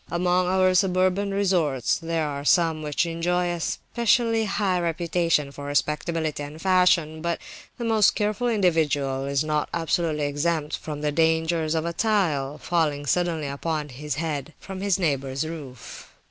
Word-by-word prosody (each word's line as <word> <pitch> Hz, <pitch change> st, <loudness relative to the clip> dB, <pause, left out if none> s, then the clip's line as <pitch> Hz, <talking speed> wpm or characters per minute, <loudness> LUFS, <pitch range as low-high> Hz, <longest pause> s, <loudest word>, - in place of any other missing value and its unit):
Among 180 Hz, +1 st, +1 dB
our 185 Hz, 0 st, +3 dB
suburban 185 Hz, +1 st, +2 dB
resorts 175 Hz, -, +1 dB
there 165 Hz, -1 st, -1 dB
are 140 Hz, -1 st, -4 dB
some 165 Hz, 0 st, +3 dB
which 150 Hz, +2 st, 0 dB
enjoy 175 Hz, +1 st, 0 dB
a 175 Hz, -, -3 dB
specially 230 Hz, +5 st, +1 dB
high 195 Hz, -3 st, 0 dB
reputation 170 Hz, -3 st, 0 dB
for 145 Hz, 0 st, -9 dB
respectability 150 Hz, +2 st, -1 dB
and 145 Hz, +2 st, -7 dB
fashion; 180 Hz, -4 st, +3 dB
but 170 Hz, 0 st, -1 dB, 0.4 s
the 240 Hz, -, -4 dB
most 220 Hz, -3 st, +4 dB
careful 210 Hz, +3 st, 0 dB
individual 155 Hz, -, +1 dB
is 140 Hz, +1 st, 0 dB
not 150 Hz, -1 st, -1 dB
absolutely 165 Hz, -2 st, 0 dB
exempt 150 Hz, +1 st, -1 dB
from 150 Hz, -2 st, -6 dB
the 150 Hz, 0 st, 0 dB
danger 160 Hz, +1 st, +2 dB
of 160 Hz, +1 st, -1 dB
a 170 Hz, -, -2 dB
tile 160 Hz, -10 st, 0 dB
falling 155 Hz, -4 st, 0 dB
suddenly 170 Hz, 0 st, 0 dB
upon 150 Hz, +2 st, -3 dB
his 145 Hz, +4 st, -5 dB
head 155 Hz, -1 st, -4 dB
from 190 Hz, -1 st, -8 dB
his 200 Hz, -2 st, +1 dB
neighbour's 140 Hz, -4 st, -1 dB
roof. 145 Hz, -7 st, -9 dB
165 Hz, 150 wpm, -25 LUFS, 150-180 Hz, 0.4 s, most